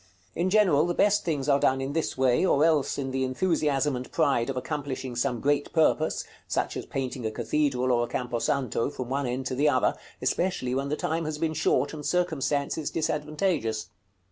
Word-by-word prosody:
In 175 +2 0
general, 185 -7 +4
the 175 - -1
best 210 0 +3
things 150 -5 -2
are 140 -1 +4
done 130 -1 +2
in 135 +1 -3
this 160 -3 -1
way, 130 +3 +3
or 155 -5 +4
else 155 -4 +2
in 135 -2 -3
the 130 0 -1
enthusiasm 145 0 +1
and 125 +1 -6
pride 140 -6 +2
of 135 - -3
accomplishing 130 -1 -4
some 120 0 0
great 145 +3 0
purpose, 160 -1 +2 0.2
such - - -1
as - - -5
painting 130 -2 -4
a 110 - 0
cathedral 130 +2 0
or 120 -1 +2
a - - -10
camposanto 125 0 -1
from 130 -4 -6
one 135 0 -1
end 125 +2 -3
to 130 - -2
the 145 +4 +3
other, 130 -3 +2 0.3
especially 175 -9 0
when 135 +2 -1
the 150 - 0
time 165 +1 -2
has 155 -1 -3
been 160 0 -1
short, 160 +1 +1
and 150 -1 -7
circumstances 150 -3 0
disadvantageous. 150 - -1
140 Hz, 195 wpm, -27 LUFS, 130-155 Hz, 0.3 s, general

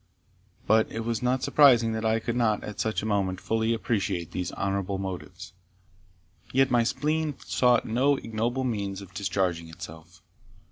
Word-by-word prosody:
But 110 +1 +3
it 115 - -4
was 115 -2 -1
not 125 +1 0
surprising 130 -5 +5
that 110 0 -3
I 110 0 +2
could 115 +1 -3
not, 110 -4 +1
at 105 - -7
such 110 -1 -1
a - - -3
moment, 100 -3 0
fully 110 +2 0
appreciate 100 -7 -1
these 90 - -3
honourable 95 0 -2
motives; 95 -3 -7 1.0
yet 135 0 +3
my 120 -1 +4
spleen 150 +4 -1
sought 125 -2 +3
no 130 +6 +2
ignoble 120 +3 -2
means 100 -5 -2
of 95 -1 -15
discharging 90 -4 -1
itself. 80 +1 -11
110 Hz, 155 wpm, -27 LUFS, 95-120 Hz, 1.0 s, surprising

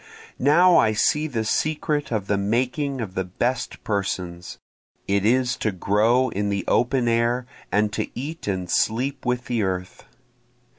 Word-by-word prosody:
Now 170 +7 +5
I 110 - +4
see 150 +8 +2
the 115 -6 -2
secret 150 +3 -1
of 110 -4 -1
the 100 - +1
making 130 +6 -1
of 100 -5 -5
the 95 - -1
best 120 +8 -3
persons, 90 -4 -3 0.5
It 100 +1 +2
is 125 +1 +2
to 110 - -1
grow 110 +7 +2
in 100 -1 -2
the 100 -2 -2
open 125 0 +2
air 120 +2 +1 0.3
and 105 0 +1
to - - -2
eat 155 +2 -6
and 95 -3 -2
sleep 125 +9 0
with 125 0 0
the 120 -4 -1
earth. 90 -2 -3
115 Hz, 155 wpm, -23 LUFS, 100-130 Hz, 0.5 s, Now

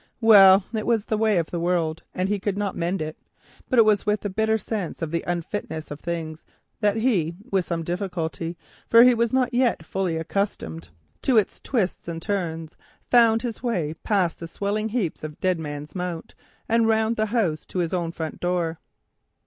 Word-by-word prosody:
Well, 195 -4 +8
it 215 -1 -2
was 225 -3 +2
the 215 - -1
way 215 -3 +3
of 165 -2 -1
the 175 - -2
world, 170 -2 0
and 185 +1 0
he 205 0 0
could 195 0 -2
not 205 -2 -2
mend 175 +1 -1
it; 155 0 -6 0.5
but 255 - +1
it 225 - +8
was 210 -2 +3
with 210 0 -1
a 205 - -1
bitter 220 +2 +1
sense 205 -3 -4
of 155 - -3
the 170 - -1
unfitness 170 -3 -4
of 145 - -6
things 160 -2 -5 0.4
that 210 -1 +2
with 195 -4 0
some 165 0 -2
little 170 +2 -2
difficulty—for 175 +4 0
he 250 0 +7
was 235 -1 +1
not 255 -1 +1
yet 240 -9 +1
fully 185 -2 -1
accustomed 160 - -3 0.3
to 255 -4 +3
its 210 - +1
twists 210 -11 -2
and 165 -1 -4
turns—he 165 -4 -3 0.3
found 230 -1 +5
his 235 -3 -4
way 180 -11 -1
past 185 -6 +1
the 165 - -6
swelling 205 +5 -2
heap 210 -8 -2
of 150 -1 -7
Dead 185 -2 +1
Man's 145 -1 -6
Mount 180 -2 -5 0.3
and 230 0 +3
round 220 +1 +2
the 215 0 0
house 205 -9 0
to - - -7
his 175 -1 0
own 170 -2 -1
front 160 -2 -5
door. 175 -2 -1
190 Hz, 190 wpm, -24 LUFS, 165-220 Hz, 0.5 s, Well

